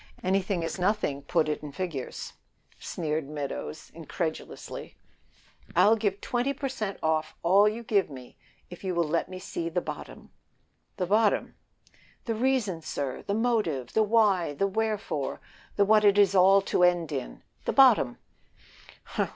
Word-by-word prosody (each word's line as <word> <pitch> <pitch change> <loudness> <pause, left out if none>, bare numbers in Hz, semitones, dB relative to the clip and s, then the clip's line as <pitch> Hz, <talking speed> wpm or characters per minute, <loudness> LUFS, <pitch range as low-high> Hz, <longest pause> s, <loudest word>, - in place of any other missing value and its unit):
"Anything 190 -1 0
is 165 - -4
nothing; 180 -7 0
put 155 +3 +1
it 150 - -2
in 150 - -7
figures," 150 -5 -5 0.5
sneered 155 -3 -3
Meadows, 150 +1 -6
incredulously. 160 0 -6 0.8
"I'll 220 +2 +6
give 205 -3 -1
twenty 250 +3 -1
per 275 +1 -3
cent 215 -7 -4
off 160 0 0
all 195 +5 +5
you 230 +2 -6
give 205 -6 +1
me 130 -3 -11 0.4
if 175 - -10
you 185 -2 -2
will 170 -2 +1
let 170 +4 -1
me 185 - -7
see 170 -2 -4
the 175 +2 0
bottom." - - -8 0.7
"The 185 - 0
bottom?" 210 +3 +2 0.7
"The 230 - -1
reason, 225 -7 0
sir 140 -4 -4
the 200 - -2
motive! 210 - 0
the 220 - +3
why! 205 -8 +2
the 195 - +1
wherefore 210 -8 -2 0.4
the 200 - +4
what 215 +1 +5
it 205 -1 +5
is 200 -2 +5
all 195 +1 +6
to 190 - -1
end 175 -3 +3
in. 135 -4 -5 0.2
The - - 0
bottom!" 240 - +5
185 Hz, 150 wpm, -27 LUFS, 160-210 Hz, 0.8 s, I'll